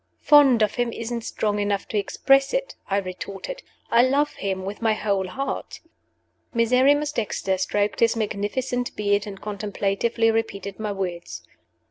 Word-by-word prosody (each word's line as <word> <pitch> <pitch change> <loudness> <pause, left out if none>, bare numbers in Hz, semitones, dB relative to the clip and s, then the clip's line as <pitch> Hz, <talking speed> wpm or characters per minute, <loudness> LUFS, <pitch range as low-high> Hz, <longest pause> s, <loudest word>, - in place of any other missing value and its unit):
"Fond 275 -6 +6
of 210 - +1
him 240 -1 -1
isn't 235 +1 -4
strong 210 -2 -1
enough 205 -1 -1
to - - -5
express 270 - +2
it," - - -2 0.2
I 195 - +2
retorted. 195 - -5 0.3
"I 235 - +6
love 280 +4 +2
him 190 -1 -3
with 200 +3 -6
my 225 -1 +3
whole 200 -3 -1
heart." 270 +9 -4 0.8
Miserrimus 260 +6 +3
Dexter 200 -5 -1
stroked 205 +2 0
his 230 0 +4
magnificent 230 +4 -2
beard, 205 0 +1
and 195 -2 -8
contemplatively 210 +2 0
repeated 200 -3 -3
my 215 -1 -2
words. 180 -3 -5
215 Hz, 145 wpm, -24 LUFS, 200-245 Hz, 0.8 s, Fond